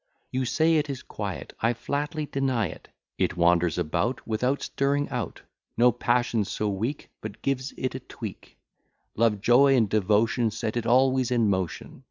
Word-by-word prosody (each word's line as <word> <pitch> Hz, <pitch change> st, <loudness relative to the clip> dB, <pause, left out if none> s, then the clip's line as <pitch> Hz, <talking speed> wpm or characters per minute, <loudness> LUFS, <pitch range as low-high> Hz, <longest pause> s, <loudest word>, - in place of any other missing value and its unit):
You 130 Hz, 0 st, -1 dB
say 160 Hz, +5 st, +3 dB
it 150 Hz, -1 st, 0 dB
is 135 Hz, -2 st, -5 dB
quiet: -, -, -6 dB
I 115 Hz, +2 st, +2 dB
flatly 145 Hz, +6 st, -3 dB
deny 135 Hz, -6 st, 0 dB
it. -, -, -11 dB, 0.3 s
It -, -, 0 dB
wanders 85 Hz, -1 st, +3 dB
about, 85 Hz, -, -1 dB
without 125 Hz, +5 st, 0 dB
stirring 140 Hz, +1 st, 0 dB
out; 120 Hz, -7 st, -4 dB, 0.4 s
No 125 Hz, +2 st, +6 dB
passion 120 Hz, -2 st, +1 dB
so 105 Hz, +2 st, -2 dB
weak 110 Hz, +9 st, -3 dB
but 110 Hz, -2 st, -8 dB
gives 135 Hz, 0 st, -1 dB
it 130 Hz, -, -2 dB
a -, -, -4 dB
tweak; -, -, -9 dB, 0.6 s
Love, 110 Hz, -3 st, +2 dB
joy, 135 Hz, +5 st, +5 dB
and 115 Hz, -4 st, +3 dB
devotion, 110 Hz, +3 st, +2 dB
set 110 Hz, +1 st, -3 dB
it 120 Hz, -1 st, -2 dB
always 130 Hz, 0 st, +3 dB
in 115 Hz, -4 st, +2 dB
motion. 95 Hz, -5 st, -3 dB
120 Hz, 165 wpm, -26 LUFS, 105-135 Hz, 0.6 s, No